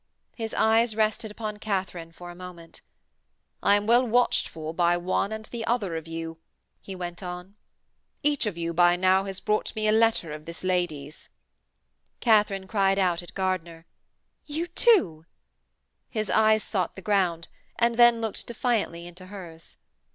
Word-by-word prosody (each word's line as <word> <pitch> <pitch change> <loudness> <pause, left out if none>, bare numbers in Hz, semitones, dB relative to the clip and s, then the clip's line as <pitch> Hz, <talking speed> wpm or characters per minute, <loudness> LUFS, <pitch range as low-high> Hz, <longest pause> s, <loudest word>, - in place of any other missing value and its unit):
His 225 -2 -5
eyes 220 0 +3
rested 220 +1 0
upon 210 0 -5
Katharine 190 -5 -3
for 175 +2 -10
a - - -12
moment. 175 -2 -11 0.8
'I 200 - +5
am 205 0 0
well 240 +3 +5
watched 245 0 +2
for 160 -1 -7
by 175 0 +2
one 185 +3 -1
and 220 0 -5
the 235 0 -6
other 210 -8 -1
of 160 0 -5
you,' 165 0 -6 0.4
he 195 - -8
went 175 0 -6
on. 180 +1 -7 0.7
'Each 290 -5 +2
of 190 -5 -4
you 170 0 -2
by 175 +1 +5
now 185 +2 +3
has 195 -1 -4
brought 210 0 -1
me 215 0 0
a - - +4
letter 220 -7 +2
of 155 0 -9
this 170 +1 -8
lady's.' 165 -6 -2 0.9
Katharine 210 -4 +3
cried 195 -1 +1
out 180 -3 +1
at 175 - -11
Gardiner: 175 -4 -2 0.6
'You 310 +3 -2
too!' 335 - +3 0.8
His 215 -3 -2
eyes 220 0 +4
sought 185 -5 -2
the 190 - -10
ground, 180 -4 +1 0.3
and 235 0 +2
then 240 0 +5
looked 225 -2 -3
defiantly 220 -8 -1
into 180 +1 -11
hers. 175 -5 -11
190 Hz, 160 wpm, -26 LUFS, 175-220 Hz, 0.9 s, I